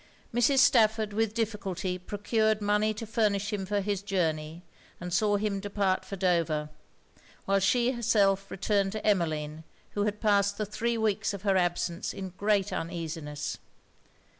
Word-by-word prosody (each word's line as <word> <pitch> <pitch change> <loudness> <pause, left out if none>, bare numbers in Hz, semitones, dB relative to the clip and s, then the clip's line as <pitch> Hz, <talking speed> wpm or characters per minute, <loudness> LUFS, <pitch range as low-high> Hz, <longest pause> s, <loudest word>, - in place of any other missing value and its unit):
Mrs. 245 +4 +3
Stafford 220 -4 +4
with 220 0 0
difficulty 195 -5 -2
procured 215 +3 0
money 210 +1 +2
to 215 +2 -6
furnish 210 -2 0
him 195 -2 -3
for 205 +1 0
his 200 -1 -2
journey, 165 -4 -2 0.4
and 180 0 -5
saw 205 +3 +3
him 205 -1 -1
depart 200 -2 0
for 195 - -6
Dover; 170 -5 +1 0.8
while 195 0 +2
she 240 +5 +2
herself 200 -5 +2
returned 200 0 0
to 215 - -5
Emmeline, 160 -6 0 0.3
who 205 0 -1
had 210 0 -2
passed 200 -2 +2
the 215 - -1
three 230 +3 -1
weeks 215 -2 0
of 195 - -10
her 195 -2 +2
absence 175 -1 -1
in 190 -1 -5
great 200 +2 0
uneasiness. 160 -3 -4
200 Hz, 150 wpm, -29 LUFS, 180-215 Hz, 0.8 s, Stafford